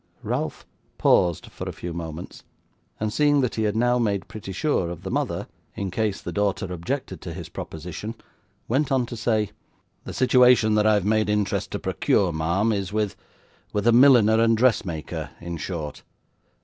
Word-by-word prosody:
Ralph - - -3 0.3
paused 85 -2 +3
for - - -6
a - - -3
few 85 -1 -6
moments, 80 0 -7 0.6
and 105 0 -2
seeing 145 0 +3
that 125 - 0
he 110 - -2
had 105 0 0
now 120 +2 +2
made 100 -5 0
pretty 105 -3 -8
sure 95 - 0
of 85 - -7
the - - -4
mother, - - -1 0.3
in 100 -2 -3
case 105 0 -1
the - - -6
daughter 100 -2 -1
objected 85 -1 -4
to - - -7
his - - -7
proposition, 90 +8 -6 0.5
went 140 +5 +1
on 130 -2 +2
to 120 - -7
say: 110 -2 0 0.5
'The - - -6
situation 125 -3 +5
that 105 0 +3
I 110 - +5
have 100 -3 0
made 110 0 +2
interest 105 -1 0
to - - 0
procure, 95 -3 +1
ma'am, 85 +8 +1
is 100 -3 -2
with 105 -1 -1 0.6
with 105 0 -1
a 120 - +6
milliner 115 -3 +6
and 115 -1 +4
dressmaker, 100 -10 0
in 85 0 -5
short. 80 -2 -5
105 Hz, 175 wpm, -24 LUFS, 90-115 Hz, 0.6 s, a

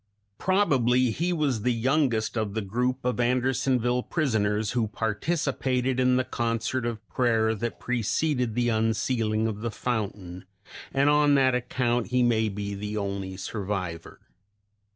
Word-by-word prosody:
Probably 130 - +3
he 170 +9 -1
was 145 -9 0
the 125 +3 +1
youngest 120 -2 +1
of 110 -2 -2
the 110 - 0
group 125 +6 -2
of 125 -1 0
Andersonville 125 0 +1
prisoners 110 -9 0
who 120 -3 0
participated 130 +3 -1
in 125 0 +3
the 130 - +2
concert 120 +1 -2
of 110 -3 -5
prayer 115 -3 +2
that 115 +2 -4
preceded 125 +1 0
the 120 -1 +1
unsealing 110 0 0
of 105 -2 -3
the 115 - -2
fountain, 100 -6 -4 0.5
and 140 +1 +2
on 145 -1 +4
that 130 -2 +4
account 125 -1 0
he 125 +1 +2
may 110 -2 +2
be 100 0 -4
the 105 +1 -4
only 100 -2 -3
survivor. 95 -4 -5
120 Hz, 140 wpm, -26 LUFS, 110-130 Hz, 0.5 s, on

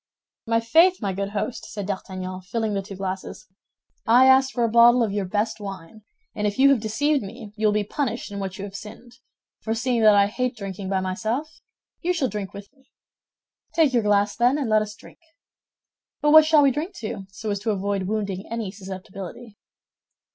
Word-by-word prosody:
"My 230 0 +2
faith, 330 +11 +4
my 200 -4 -2
good 195 +1 -3
host," 210 +4 -4
said 205 -2 -5
D'Artagnan, 185 -1 -5
filling 215 +3 -2
the 200 - -1
two 195 0 -9
glasses, 190 +2 -5 0.6
"I 245 +3 +6
asked 265 0 +5
for 240 - -1
a - - +3
bottle 235 +2 +6
of 215 - -1
your 200 -1 -1
best 210 +4 -1
wine, 195 0 -8 0.3
and 210 0 -1
if 205 - -3
you 275 +1 +6
have 270 - +3
deceived 270 +7 0
me, 210 +1 -9
you 215 0 +1
will - - +3
be 210 0 +1
punished 235 0 -3
in 200 - -5
what 190 -1 -5
you 195 - -6
have 200 -1 -10
sinned; 230 +4 -11 0.4
for 225 0 -2
seeing 240 0 0
that 215 -1 +7
I 200 0 +5
hate 245 +3 -2
drinking 195 -1 -6
by 190 -1 0
myself, 230 - -3 0.4
you 360 +2 +1
shall 295 -7 0
drink 200 -2 -5
with 200 +5 -11
me. 270 -2 -30 0.9
Take 315 -5 +3
your 240 - +3
glass, 205 -1 +2
then, 245 +4 +3
and 265 -7 -2
let 215 0 +5
us 210 0 -5
drink. - - -16 1.0
But 295 - +2
what 315 0 +9
shall 310 -2 +5
we 275 - +5
drink 320 +9 -4
to, 205 - -6
so 210 +2 -5
as 200 - -2
to 220 - -3
avoid 200 -2 -1
wounding 200 -2 -3
any 225 -4 -3
susceptibility? 195 +2 -9
215 Hz, 205 wpm, -24 LUFS, 195-245 Hz, 1.0 s, what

